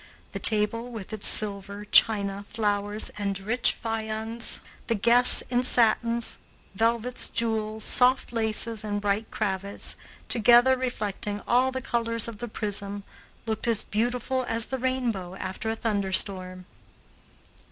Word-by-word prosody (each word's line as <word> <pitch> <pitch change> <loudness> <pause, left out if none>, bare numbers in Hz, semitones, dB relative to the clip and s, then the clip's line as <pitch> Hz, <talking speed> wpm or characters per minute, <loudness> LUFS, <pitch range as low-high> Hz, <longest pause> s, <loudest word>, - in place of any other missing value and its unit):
The - - -5
table, 230 +3 +3
with 220 -2 -8
its 215 - 0
silver, 200 0 0
china, 200 -2 +3
flowers, 205 -1 -1
and 200 -1 -2
rich 225 +5 0
viands, 225 0 -3 0.3
the 230 - 0
guests 235 +4 +6
in 245 0 +2
satins, 235 -1 +1 0.3
velvets, 230 +4 0
jewels, 220 -1 -1
soft 250 0 +3
laces, 220 -1 -1
and 205 -1 -3
bright 205 +2 -2
cravats, 200 -1 -3 0.3
together 240 +3 +5
reflecting 210 -5 -3
all 255 +2 +3
the 260 0 -4
colors 230 -1 +2
of 225 -3 -8
the 240 - -5
prism, 205 -2 -4 0.4
looked 220 0 -3
as 230 -2 +1
beautiful 245 +4 -1
as 230 -1 0
the 265 - -4
rainbow 235 -8 -2
after 190 +4 -5
a 225 - -1
thunderstorm. 190 -4 -2
220 Hz, 130 wpm, -26 LUFS, 205-235 Hz, 0.4 s, guests